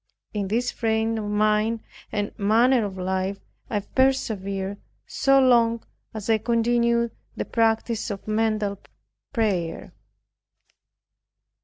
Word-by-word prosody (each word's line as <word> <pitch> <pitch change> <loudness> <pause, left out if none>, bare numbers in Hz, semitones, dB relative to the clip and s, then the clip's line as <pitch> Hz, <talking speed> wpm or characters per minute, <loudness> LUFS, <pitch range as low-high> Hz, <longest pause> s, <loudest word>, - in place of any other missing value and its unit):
In 205 -2 -2
this 240 +5 0
frame 225 0 0
of 210 - -4
mind 215 +2 +1 0.3
and 205 0 -2
manner 230 +3 +3
of 195 -2 -6
life 190 +1 -1 0.3
I 210 -2 0
persevered, 200 -6 0 0.3
so 275 0 +3
long 235 -3 +4 0.3
as 215 -3 -6
I 220 -1 +3
continued 235 +1 +2 0.2
the - - -3
practice 225 0 0
of 200 -1 -6
mental 215 -2 0 0.5
prayer. 185 -8 -1
220 Hz, 110 wpm, -24 LUFS, 205-235 Hz, 0.5 s, long